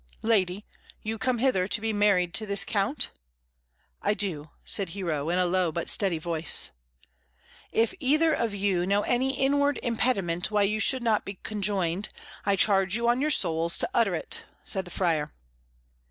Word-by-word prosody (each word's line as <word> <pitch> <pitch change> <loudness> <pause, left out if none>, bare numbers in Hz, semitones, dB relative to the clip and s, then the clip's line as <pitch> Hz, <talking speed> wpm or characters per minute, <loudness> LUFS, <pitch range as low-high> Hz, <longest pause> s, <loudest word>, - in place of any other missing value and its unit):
"Lady, 205 -3 +1 0.4
you 220 0 -4
come 255 0 0
hither 230 -7 +1
to 210 - +1
be 220 +1 -2
married 200 -4 +2
to 215 - +2
this 200 0 +4
Count?" 210 +8 -1 0.9
"I 205 - 0
do," 160 -8 -3 0.2
said 195 -4 +1
Hero, 160 -5 -2
in 175 - 0
a 180 - +2
low 180 -1 +1
but 170 +1 -3
steady 190 -5 +2
voice. 165 0 +1 1.0
"If 225 +1 +1
either 310 +3 +2
of 230 -6 -2
you 190 -3 0
know 200 +1 +1
any 260 +2 0
inward 285 +1 +1
impediment 200 -8 0
why 210 -1 +1
you 210 +2 0
should 260 +2 +4
not 220 -3 +1
be 200 - -7
conjoined, 200 -3 -1 0.4
I 200 - +3
charge 195 0 +2
you 235 0 -1
on 240 +2 +2
your 300 - +1
souls 170 - +3
to - - 0
utter - - +2
it," - - -2 0.2
said 190 -2 -2
the - - -10
Friar. 160 -5 -1
200 Hz, 170 wpm, -26 LUFS, 180-230 Hz, 1.0 s, this